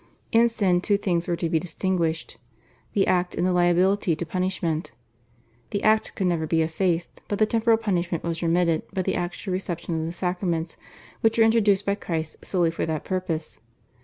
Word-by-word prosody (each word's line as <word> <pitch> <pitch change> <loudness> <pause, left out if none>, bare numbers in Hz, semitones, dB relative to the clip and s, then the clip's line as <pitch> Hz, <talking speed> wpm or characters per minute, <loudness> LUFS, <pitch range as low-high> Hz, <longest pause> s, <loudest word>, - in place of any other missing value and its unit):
In 235 -1 +5
sin 190 -6 +1
two 205 +1 +2
things 175 -4 -1
were 175 - +1
to 170 - -1
be 160 0 +1
distinguished, 165 -3 -2 0.6
the 195 - +3
act 180 -1 +1
and - - 0
the 185 - +2
liability 180 +1 +3
to 170 - -4
punishment. 180 -2 -2 0.8
The 200 - -3
act 215 0 +2
could 195 - -1
never 170 -3 0
be 160 +1 +2
effaced, 170 +1 -1
but 205 - -1
the 215 - +4
temporal 225 +1 +3
punishment 180 -6 -1
was 165 0 -3
remitted 170 -1 +2
by 190 -2 -1
the - - 0
actual 180 +2 -3
reception 175 -3 -3
of 160 - -2
the - - -3
sacraments, 175 -2 -2 0.4
which 225 0 +2
were 225 - +6
introduced 210 -3 +3
by 200 - +2
Christ 160 -5 -4
solely 175 -3 +1
for 165 - -3
that 155 -2 -3
purpose. 180 -4 -3
180 Hz, 185 wpm, -25 LUFS, 165-195 Hz, 0.8 s, were